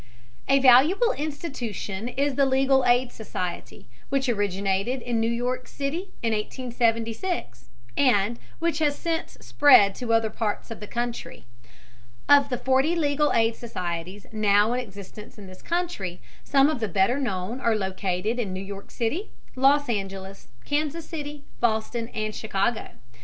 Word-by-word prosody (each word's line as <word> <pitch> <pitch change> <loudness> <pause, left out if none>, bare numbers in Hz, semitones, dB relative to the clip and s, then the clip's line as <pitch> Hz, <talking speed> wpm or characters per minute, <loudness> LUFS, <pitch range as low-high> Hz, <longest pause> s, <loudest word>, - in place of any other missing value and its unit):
A 275 - +6
valuable 275 - +6
institution 250 - -4
is 275 +3 0
the 275 +1 +3
legal 265 0 +3
aid 245 +1 +3
society, 185 -5 -6 0.2
which 275 -1 0
originated 200 +2 0
in 240 -2 -1
New 225 0 +1
York 250 +2 -2
City 310 +8 -4
in 225 -1 +1
1876, 230 - -2 0.3
and 235 -4 +2 0.2
which 335 -2 0
has 295 -2 +2
since 330 -1 -3
spread 255 -9 +6
to 240 +2 -4
other 225 -1 +2
parts 215 0 -3
of 225 - -6
the 210 - -8
country. 240 +1 -4 0.8
Of 285 -1 +6
the 250 - -1
forty 265 +7 +2
legal 295 -2 +2
aid 225 0 +2
societies 185 -4 -5
now 210 +1 +3
in 250 - 0
existence 205 -2 -10
in 205 - -10
this 185 0 -13
country, 335 - -3 0.2
some 275 0 +4
of 305 -4 -1
the 220 - -1
better 195 +8 +2
known 210 -1 -3
are 230 -3 +2
located 190 +2 -2
in 210 -6 -2
New 185 - -4
York 200 0 -8
City, 300 - -2 0.3
Los 280 +2 +4
Angeles, 195 - -4 0.2
Kansas 305 +2 -1
City, 295 -3 -6 0.2
Boston, 230 0 0
and 215 0 -2
Chicago. 220 +2 -2
235 Hz, 145 wpm, -25 LUFS, 205-275 Hz, 0.8 s, A